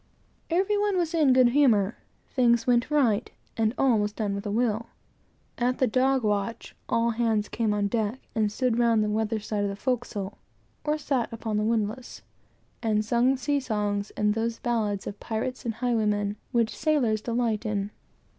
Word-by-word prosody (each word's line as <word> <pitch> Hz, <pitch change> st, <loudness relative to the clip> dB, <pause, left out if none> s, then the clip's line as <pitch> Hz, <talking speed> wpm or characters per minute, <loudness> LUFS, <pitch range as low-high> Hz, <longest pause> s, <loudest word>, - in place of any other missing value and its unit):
Every 385 Hz, +5 st, +1 dB
one 410 Hz, -2 st, +1 dB
was 345 Hz, -2 st, 0 dB
in 305 Hz, -5 st, +4 dB
good 255 Hz, -1 st, +6 dB
humor; 235 Hz, -7 st, +3 dB, 0.3 s
things 235 Hz, -3 st, +2 dB
went 245 Hz, 0 st, +2 dB
right; 250 Hz, -7 st, +2 dB, 0.3 s
and 220 Hz, -1 st, +1 dB
all 255 Hz, -5 st, +3 dB
was 205 Hz, 0 st, 0 dB
done 210 Hz, -2 st, -2 dB
with 200 Hz, +1 st, -4 dB
a -, -, -2 dB
will. 230 Hz, 0 st, 0 dB, 0.7 s
At 250 Hz, +1 st, +1 dB
the 260 Hz, -, +3 dB
dog 260 Hz, +2 st, +2 dB
watch, 210 Hz, +2 st, -2 dB
all 230 Hz, 0 st, +2 dB
hands 220 Hz, -2 st, 0 dB
came 225 Hz, -2 st, -1 dB
on 205 Hz, -1 st, 0 dB
deck, 220 Hz, +3 st, -1 dB
and 215 Hz, -3 st, +1 dB
stood 240 Hz, 0 st, 0 dB
round 230 Hz, -2 st, +3 dB
the 210 Hz, -, -1 dB
weather 220 Hz, +1 st, 0 dB
side 210 Hz, 0 st, -3 dB
of 200 Hz, -, 0 dB
the 200 Hz, -, -4 dB
forecastle, 210 Hz, -4 st, -3 dB, 0.4 s
or 300 Hz, 0 st, 0 dB
sat 275 Hz, -5 st, -1 dB
upon 225 Hz, -2 st, -3 dB
the 210 Hz, -, +1 dB
windlass, 225 Hz, +2 st, -2 dB, 0.6 s
and 215 Hz, -2 st, +1 dB
sung 245 Hz, +4 st, +2 dB
sea 285 Hz, +2 st, 0 dB
songs, 210 Hz, -5 st, -2 dB
and 210 Hz, 0 st, +2 dB
those 225 Hz, +1 st, -2 dB
ballads 215 Hz, -5 st, -1 dB
of 205 Hz, -, -6 dB
pirates 245 Hz, +4 st, -4 dB
and 225 Hz, -2 st, -2 dB
highwaymen, 210 Hz, -4 st, 0 dB, 0.2 s
which 235 Hz, -2 st, +1 dB
sailors 265 Hz, -8 st, +1 dB
delight 230 Hz, -2 st, -1 dB
in. 205 Hz, -2 st, -2 dB
230 Hz, 175 wpm, -26 LUFS, 210-255 Hz, 0.7 s, good